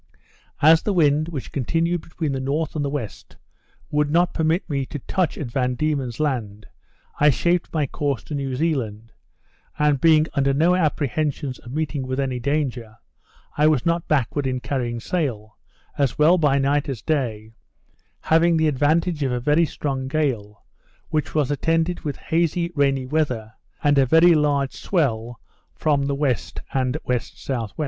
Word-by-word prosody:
As 160 +2 +7
the 205 - -1
wind, 155 -2 +3
which 145 -6 -6
continued 165 +5 0
between 160 -2 -4
the 135 - -2
north 145 +5 -2
and 150 - -1
the 140 - -1
west, 120 - -6 0.6
would 150 -1 +1
not 175 +3 +2
permit 160 +3 0
me 140 -4 -1
to - - -5
touch 175 +5 -1
at 130 -6 -5
Van 125 0 0
Diemen's 140 -5 -2
Land, 110 -9 -2 0.5
I 150 - +6
shaped 170 +5 +1
my 155 -3 0
course 140 -3 -2
to - - -8
New 135 -2 -2
Zealand; 115 -8 -2 0.7
and, 150 -3 +2
being 155 -2 +5
under 135 -1 +1
no 165 +5 +3
apprehensions 150 -4 -1
of 120 - -11
meeting 145 -2 -2
with 130 +1 -2
any 130 -2 -1
danger, 125 -5 -2 0.6
I 150 +1 +4
was 150 -6 +2
not 170 0 0
backward 140 -1 0
in 130 -1 -1
carrying 120 -3 -3
sail, 115 - -3 0.4
as 140 -5 +1
well 165 +4 +5
by 145 -3 +3
night 140 +1 +1
as 130 -5 -5
day, 115 -8 -2 0.7
having 165 +1 +3
the 160 0 +2
advantage 155 +3 +1
of 135 -2 0
a 125 - -1
very 150 +6 +3
strong 135 -3 -3
gale, 125 -9 -2 0.4
which 155 -1 -2
was 145 -3 +1
attended 165 +4 0
with 145 -3 -4
hazy 170 +1 0
rainy 140 -3 +1
weather, 130 -7 -1 0.3
and 145 -1 +4
a 135 - +4
very 165 +5 +6
large 145 -3 +1
swell 120 - -1 0.4
from 145 -3 +1
the 140 - -1
W. 140 -2 +2 0.4
and 130 -2 +1
W.S.W. 125 -4 -3
145 Hz, 165 wpm, -22 LUFS, 130-155 Hz, 0.7 s, As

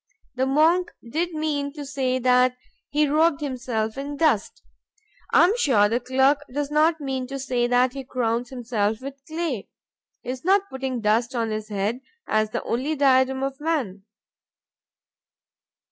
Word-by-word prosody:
The 260 +1 0
monk 325 +6 +3 0.2
did 335 +8 -2
mean 290 -2 -2
to 295 -2 -7
say 265 -2 -1
that 250 0 +3 0.3
he 300 +1 +2
robed 310 +1 +3
himself 245 -5 -3
in 285 +1 -5
dust. 285 -11 +1 0.7
I - - +6
am 375 +6 +4
sure 225 - +4
the 230 +3 0
clerk 265 +3 +2
does 290 +2 -3
not 315 +2 +3
mean 265 -3 -3
to 275 +1 -5
say 250 -2 0
that 250 +1 +3
he 275 -1 -6
crowns 240 -2 -1
himself 225 -4 -1
with 275 +1 -8
clay. 315 - -3 0.5
He - - -8
is 255 -1 -7
not 395 +2 +2
putting 265 -2 -3
dust 230 +4 +1
on 230 -2 -1
his 215 0 -4
head, 205 +4 -1 0.3
as 215 0 +1
the - - -3
only 270 +7 -1
diadem 265 -1 +3
of 275 0 -3
man. 275 - -1
265 Hz, 160 wpm, -24 LUFS, 240-290 Hz, 0.7 s, I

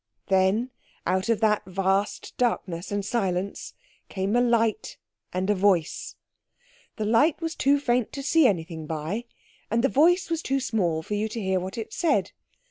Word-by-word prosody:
Then 195 +6 +2 0.3
out 190 +4 0
of 230 -1 +1
that 210 -1 +3
vast 195 +2 -1
darkness 190 -7 -1
and 205 -1 -2
silence 195 -4 -2 0.3
came 195 +2 -1
a 245 - +4
light 230 -3 +1 0.3
and 185 +1 -2
a 210 - +3
voice. 185 -5 +1 0.8
The 215 - -3
light 275 +9 +3
was 330 -1 -3
too 280 -1 +2
faint 245 -4 0
to 275 - -5
see 320 0 +5
anything 165 -5 -2
by, 160 +9 -3 0.4
and 230 +2 +1
the 270 - +4
voice 350 +5 +3
was 330 -1 0
too 275 -2 0
small 180 -11 0
for 210 - -5
you 210 +1 0
to 230 - -5
hear 190 -2 0
what 185 +3 -6
it 220 -1 -6
said. 335 - +1
210 Hz, 170 wpm, -26 LUFS, 190-245 Hz, 0.8 s, see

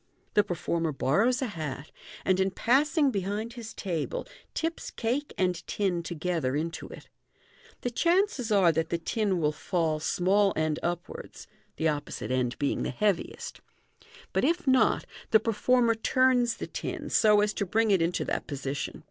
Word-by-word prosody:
The 210 - +5
performer 165 -2 -1
borrows 220 - +2
a - - +1
hat, 155 - -5 0.3
and 185 0 +3
in 190 0 +3
passing 275 - +2
behind 205 +3 -3
his 235 -3 -8
table, 190 - -3 0.3
tips 325 +1 -2
cake 255 +6 -2
and 180 -2 +1
tin 190 -4 0
together 165 -5 -2
into 160 +2 -3
it. - - -11 0.7
The 245 - -2
chances 335 - +1
are 190 -5 +5
that 160 0 -1
the 170 - 0
tin 195 +2 0
will 150 -2 +2
fall 160 0 -1
small 195 +5 +2
end 155 -1 0
upwards, 175 0 -5 0.3
(the 160 - 0
opposite 145 -3 -3
end 125 -1 0
being 140 - 0
the - - -1
heaviest) 195 +7 -2 0.4
j - - -23 0.3
but - - +1
if 340 +4 +1
not, 260 -1 +3 0.2
the 220 - +6
performer 230 +2 +2
turns 245 +1 +2
the - - -4
tin, - - -5
so 210 -1 +5
as 210 0 +1
to - - -1
bring 220 +3 +2
it 190 -3 +4
into 170 +2 0
that - - -2
position. 140 -1 -4
195 Hz, 165 wpm, -28 LUFS, 165-235 Hz, 0.7 s, the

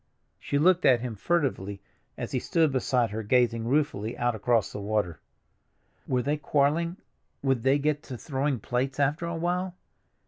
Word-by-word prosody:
She 140 - -1
looked 180 +4 +4
at 120 -3 +5
him 125 -2 -4
furtively 105 - -1 0.4
as - - -5
he - - 0
stood 160 -3 +2
beside 125 -3 +1
her 110 +1 -3
gazing 115 0 +2
ruefully 125 -6 0
out 120 0 +1
across 110 -1 +1
the 105 - -6
water. 100 -5 -1 0.9
Were 125 -1 +1
they 145 +3 0
quarreling—would 145 -3 -1
they 135 +4 +3
get 150 0 0
to 125 - -6
throwing 135 -1 -1
plates 130 +5 -2
after 145 +4 +1
a 170 - -3
while? 180 +2 -1
135 Hz, 160 wpm, -27 LUFS, 115-150 Hz, 0.9 s, at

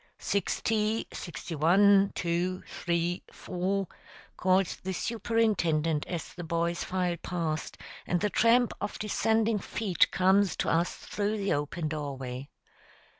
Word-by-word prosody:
"Sixty, 215 +2 0
sixty 175 0 -6
one, 195 +6 +5
two, 180 +2 -1
three, 170 +1 -1
four," 190 +2 -2 0.5
calls 185 0 +2
the 190 0 -4
Superintendent 185 -9 +1
as 175 -3 -5
the 175 - -7
boys 170 +1 -1
file 180 -2 -1
past, 165 -3 -3 0.3
and 175 - +1
the 210 +1 0
tramp 235 +1 +4
of 205 - -3
descending 220 +1 +1
feet 195 -2 +1
comes 190 0 +3
to - - -1
us 170 +2 +1
through 210 +1 -2
the 200 -1 0
open 150 +3 -2
doorway. 140 -3 -5
180 Hz, 125 wpm, -29 LUFS, 170-205 Hz, 0.5 s, one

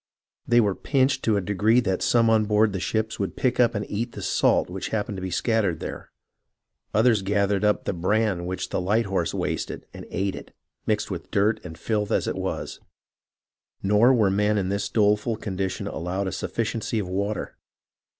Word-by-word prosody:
They 120 0 +5
were 105 -4 +3
pinched 135 +4 +1
to 110 - +3
that 100 -3 -1
degree 105 +5 +3
that 95 -5 -1
some 115 -1 +3
on 110 -1 +4
board 105 0 +3
the 95 - -2
ships 110 +4 -2
would 100 - -2
pick 130 -1 0
up 120 -2 +4
and 105 - -2
eat 115 +4 -3
the - - -7
salt - - +2
which - - -5
happened 105 -2 -2
to - - -6
be 95 - -3
scattered 100 -1 0
there; - - -7 0.8
others 110 -1 +3
gathered 100 0 +1
up 105 0 +2
the - - -2
bran 95 0 0
which 95 0 -3
the - - -1
light 105 +5 +1
horse 95 -4 -1
wasted, - - -3
and - - -9
ate 95 0 -1
it, - - -11 0.3
mixed 105 -1 0
with 85 -3 -6
dirt 105 +1 +1
and 80 -2 -9
filth 105 +3 -1
as - - +1
it - - -1
was.... - - -4 0.5
" - - -44
Nor 105 +6 +5
were 105 -5 +3
the - - 0
men 105 +1 +2
in 95 -2 0
this 100 +1 -1
doleful 105 +1 +2
condition 95 -3 -3
allowed 90 +4 -3
a 95 - -2
sufficiency 115 0 -2
of 100 -4 -1
water. 100 +3 -3
105 Hz, 200 wpm, -25 LUFS, 95-110 Hz, 0.8 s, They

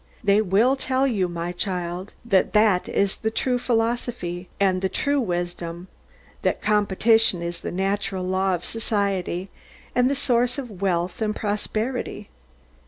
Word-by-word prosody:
They 200 +1 +4
will 215 +7 +3
tell 265 0 +1
you, 205 -9 +1
my 170 0 -4
child, 180 0 -3
that 195 -5 +2
that 210 -4 +4
is 200 -1 +1
the 220 - -1
true 250 +2 0
philosophy, 225 -7 -1
and 190 -2 +2
the 190 - +1
true 285 +8 +1
wisdom; 175 -2 -3 0.5
that - - +1
competition 210 -2 +3
is 170 0 -4
the - - -4
natural 195 0 -1
law 190 0 +1
of 175 - -6
society, 200 -4 -2 0.4
and 250 +1 +3
the 280 - +1
source 250 -1 +1
of 230 -9 -7
wealth 180 0 0
and 215 -1 0
prosperity. 215 +4 -3
200 Hz, 145 wpm, -24 LUFS, 180-230 Hz, 0.5 s, They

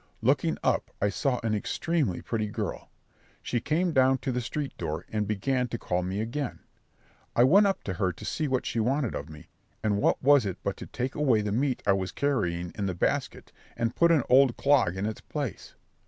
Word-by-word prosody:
Looking - - +2
up - - +1
I 100 - +2
saw 125 +5 0
an 110 -1 0
extremely 135 - -1
pretty 110 -2 -2
girl; 105 - -5 0.5
she 120 - -1
came 165 +6 +1
down 130 -2 +4
to 135 - +1
the 125 0 -1
street 140 +4 -4
door, 75 +1 -3
and 105 -2 -1
began 125 +5 0
to 120 - -4
call 90 -4 -1
me 95 +3 -2
again. 125 +4 -3 0.8
I 120 - +6
went 195 +11 +6
up 195 - -1
to 95 - -3
her 90 +1 0
to 105 - -10
see 155 +7 -1
what 130 -2 0
she 115 - -1
wanted 130 +2 0
of 70 +3 -5
me; 75 -1 -12 0.3
and 105 -2 +1
what - - +2
was 140 -1 +6
it 95 -3 -3
but - - -1
to - - -8
take 130 +2 -3
away 130 -7 +2
the 105 - -2
meat 130 +4 0
I 100 - +4
was 95 -1 -2
carrying 90 -12 -1
in 100 -2 -2
the 95 - -2
basket - - -2 0.3
and 115 0 -1
put 170 - +4
an 155 -6 +4
old 130 -1 +5
clog 135 -11 +3
in 95 - -1
its 110 0 -4
place? 140 - -5
120 Hz, 215 wpm, -28 LUFS, 100-140 Hz, 0.8 s, I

